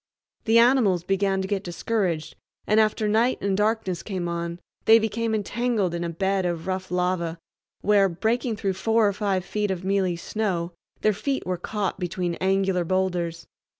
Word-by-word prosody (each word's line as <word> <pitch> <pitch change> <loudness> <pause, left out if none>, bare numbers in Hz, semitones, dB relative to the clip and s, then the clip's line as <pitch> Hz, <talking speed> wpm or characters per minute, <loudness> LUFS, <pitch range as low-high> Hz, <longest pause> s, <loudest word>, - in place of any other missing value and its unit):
The 225 0 +4
animals 230 -8 +4
began 195 +1 +1
to - - -3
get 200 -1 -1
discouraged, 175 -3 -2 0.3
and 215 +1 +3
after 215 0 +2
night 225 +4 +2
and 200 -1 0
darkness 210 -3 0
came 185 -4 -4
on 170 0 -3 0.3
they 225 - +8
became 225 0 -1
entangled 215 -3 0
in 170 0 -2
a 170 - -2
bed 190 +3 0
of 170 -2 -2
rough 185 0 -3
lava, 180 -2 -1 0.4
where, 200 -2 +4
breaking 225 +6 -1
through 195 -2 -1
four 225 +3 +2
or 200 - +1
five 195 -3 -1
feet 210 +2 -1
of 190 -1 -3
mealy 190 -2 +1
snow, 180 -2 -2 0.3
their 215 - +3
feet 270 +6 -2
were 185 0 -1
caught 200 +1 -3
between 180 -1 -2
angular 190 -1 +2
boulders. 175 -2 -1
195 Hz, 170 wpm, -25 LUFS, 180-215 Hz, 0.4 s, they